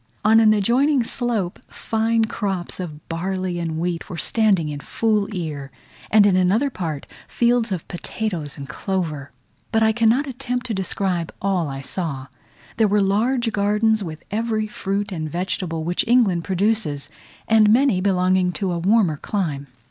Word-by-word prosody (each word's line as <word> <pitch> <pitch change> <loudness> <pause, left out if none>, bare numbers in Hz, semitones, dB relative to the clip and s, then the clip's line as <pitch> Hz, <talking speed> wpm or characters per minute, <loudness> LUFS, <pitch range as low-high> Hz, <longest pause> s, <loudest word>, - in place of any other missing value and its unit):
On 220 +1 +6
an 220 -1 +6
adjoining 245 +6 +3
slope, 225 -7 -1
fine 225 0 0
crops 195 -6 -3
of 155 -5 -7
barley 185 +1 -2
and 165 -2 -3
wheat 170 +2 -3
were 175 - -6
standing 195 -6 +2
in 145 -1 -5
full 210 +5 0
ear; 155 -7 -4 0.4
and 210 -1 +6
in 200 -2 +4
another 200 +10 +2
part, 160 - -4 0.2
fields 235 -2 +1
of 180 -4 -3
potatoes 175 -4 -4
and 140 -1 -7
clover. 155 -3 -3 0.4
But 225 -1 +3
I 220 - +4
cannot 230 +5 +3
attempt 250 -2 -3
to 235 - -2
describe 185 -3 -2
all 185 -5 0
I 135 0 -5
saw; 140 -4 -4 0.5
there 220 -2 +4
were 205 +1 +2
large 225 +5 +1
gardens, 210 +1 +2
with 155 -3 -7
every 220 0 0
fruit 200 -1 -3
and 155 -4 -4
vegetable 175 -1 -3
which 175 +2 0
England 220 -8 +3
produces; 190 -6 0 0.4
and 215 -1 +5
many 240 -5 +3
belonging 185 -1 +2
to 195 -1 -2
a 170 - -2
warmer 190 -4 +3
clime. 150 -7 -3
195 Hz, 155 wpm, -22 LUFS, 170-220 Hz, 0.5 s, On